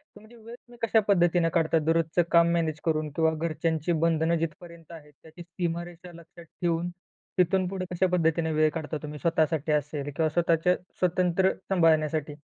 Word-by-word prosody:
तुमची 215 Hz, +3 st, -16 dB
वेळ 230 Hz, +1 st, -11 dB
तुम्ही 240 Hz, 0 st, -19 dB
कशा 220 Hz, -, +4 dB
पद्धतीने 175 Hz, -3 st, +3 dB
काढता 165 Hz, -1 st, +2 dB
दररोजचं 165 Hz, +1 st, +2 dB
काम 170 Hz, 0 st, +5 dB
मॅनेज 160 Hz, -3 st, -1 dB
करून? 155 Hz, -1 st, 0 dB
किंवा 160 Hz, -1 st, +2 dB
घरच्यांची 160 Hz, +1 st, -2 dB
बंधनं 165 Hz, 0 st, +1 dB
जिथपर्यंत 165 Hz, +1 st, -7 dB
आहेत 150 Hz, -2 st, -13 dB
त्याची 160 Hz, +2 st, -13 dB
सीमारेषा 175 Hz, 0 st, -5 dB
लक्षात 170 Hz, +1 st, -14 dB
ठेवून, 170 Hz, +1 st, -2 dB, 0.5 s
तिथून 180 Hz, +1 st, +2 dB
पुढे 185 Hz, -1 st, -4 dB
कशा 180 Hz, +1 st, +1 dB
पद्धतीने 165 Hz, -2 st, +1 dB
वेळ 155 Hz, 0 st, +3 dB
काढता 155 Hz, -1 st, -4 dB
तुम्ही 150 Hz, 0 st, -7 dB
स्वतःसाठी 160 Hz, -2 st, 0 dB
असेल 150 Hz, -1 st, -2 dB
किंवा 160 Hz, -1 st, +1 dB
स्वतःच्या 170 Hz, +2 st, +2 dB, 0.2 s
स्वतंत्र 180 Hz, +1 st, +2 dB, 0.2 s
सांभाळण्यासाठी? 155 Hz, -4 st, +1 dB
165 Hz, 155 wpm, -27 LUFS, 160-175 Hz, 0.5 s, काम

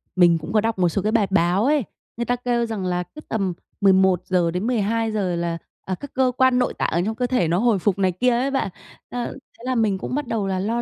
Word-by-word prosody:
mình 175 Hz, -2 st, +5 dB
cũng 165 Hz, +5 st, -7 dB
có 215 Hz, -, +4 dB
đọc 225 Hz, -2 st, -1 dB
một 175 Hz, -1 st, +3 dB
số 195 Hz, -, -1 dB
cái 210 Hz, +3 st, 0 dB
bài 220 Hz, -3 st, +2 dB
báo 185 Hz, +2 st, +2 dB
ấy, 290 Hz, -1 st, +3 dB, 0.3 s
người 235 Hz, -, -1 dB
ta 245 Hz, -, +1 dB
kêu 245 Hz, -1 st, 0 dB
rằng 220 Hz, -5 st, -4 dB
là 180 Hz, 0 st, 0 dB
cứ 305 Hz, +11 st, -13 dB
tầm 195 Hz, -5 st, -1 dB, 0.3 s
11:00-12:00 190 Hz, +2 st, +2 dB
là, 170 Hz, 0 st, -2 dB, 0.3 s
à, 190 Hz, -, -2 dB
các 285 Hz, +9 st, -10 dB
cơ 255 Hz, -1 st, +2 dB
quan 260 Hz, -1 st, +4 dB
nội 250 Hz, -, +1 dB
tạng -, -, -1 dB
ở 170 Hz, -, +1 dB
trong 220 Hz, +1 st, -2 dB
cơ 245 Hz, +2 st, -1 dB
thể 245 Hz, -9 st, +1 dB
nó 170 Hz, +2 st, +1 dB
hồi 225 Hz, -1 st, +2 dB
phục 195 Hz, +1 st, +1 dB
này 190 Hz, -1 st, +3 dB
kia 220 Hz, +9 st, +1 dB
ấy 250 Hz, +3 st, +1 dB
bạn, 270 Hz, -7 st, 0 dB, 0.4 s
a, 245 Hz, -1 st, -3 dB
thế 265 Hz, -2 st, -11 dB
là 255 Hz, 0 st, 0 dB
mình 215 Hz, -4 st, +2 dB
cũng 220 Hz, -, -4 dB
bắt 290 Hz, -2 st, -2 dB
đầu 215 Hz, -4 st, -1 dB
là 190 Hz, -1 st, -1 dB
lo 225 Hz, +5 st, -1 dB
210 Hz, 250 wpm, -22 LUFS, 185-245 Hz, 0.4 s, mình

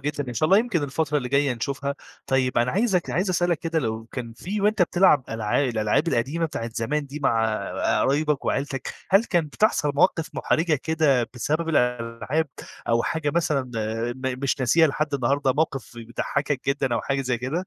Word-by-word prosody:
جدًا 145 Hz, -1 st, -3 dB
إن 120 Hz, -, -5 dB
شاء 155 Hz, -, +2 dB
الله 195 Hz, +4 st, +6 dB
يمكن 220 Hz, -9 st, 0 dB
الفترة 150 Hz, +1 st, -1 dB
اللي 125 Hz, -2 st, -4 dB
جاية 140 Hz, -1 st, +2 dB
نشوفها. 140 Hz, +4 st, -3 dB, 0.3 s
طيب، 130 Hz, -2 st, +1 dB
أنا 120 Hz, +1 st, +2 dB
عايزك 195 Hz, -4 st, +1 dB
عايز 185 Hz, +2 st, 0 dB
أسألك 175 Hz, -2 st, +1 dB
كده 165 Hz, -1 st, -1 dB
لو 110 Hz, -4 st, -3 dB
كان 120 Hz, -3 st, -5 dB
في 195 Hz, -, -4 dB
وأنت 210 Hz, -2 st, +3 dB
بتلعب 170 Hz, -6 st, +4 dB
ألعا 110 Hz, +2 st, 0 dB
الألعاب 120 Hz, +6 st, +1 dB
القديمة 150 Hz, +6 st, 0 dB
بتاعة 115 Hz, -7 st, -5 dB
زمان 145 Hz, +6 st, -1 dB
دي 145 Hz, +2 st, -7 dB
مع 110 Hz, -4 st, +2 dB, 0.5 s
قرايبك 145 Hz, +1 st, +1 dB
وعيلتك، 135 Hz, -1 st, -2 dB, 0.2 s
هل 195 Hz, +4 st, +5 dB
كان 175 Hz, -7 st, +1 dB
بتحصل 150 Hz, -3 st, +1 dB
مواقف 165 Hz, 0 st, +2 dB
مُحرِجة 160 Hz, 0 st, +1 dB
كده 150 Hz, -7 st, +2 dB
بسبب 155 Hz, +7 st, -1 dB
الألعاب 125 Hz, +2 st, 0 dB, 0.4 s
أو 115 Hz, 0 st, +3 dB
حاجة 160 Hz, -3 st, -1 dB
مثلًا 155 Hz, -5 st, +1 dB, 0.5 s
م 130 Hz, -1 st, -3 dB
مش 135 Hz, +1 st, 0 dB
ناسيها 160 Hz, +7 st, +5 dB
لحد 150 Hz, 0 st, -1 dB
النهاردة، 135 Hz, +1 st, +1 dB
موقف 140 Hz, -4 st, -2 dB
بيضحّكك 130 Hz, +4 st, -2 dB
جدًا 135 Hz, -3 st, +1 dB
أو -, -, 0 dB
حاجة 135 Hz, 0 st, -1 dB
زي 125 Hz, -2 st, -1 dB
كده؟ 155 Hz, +10 st, -3 dB
140 Hz, 175 wpm, -24 LUFS, 125-160 Hz, 0.5 s, الله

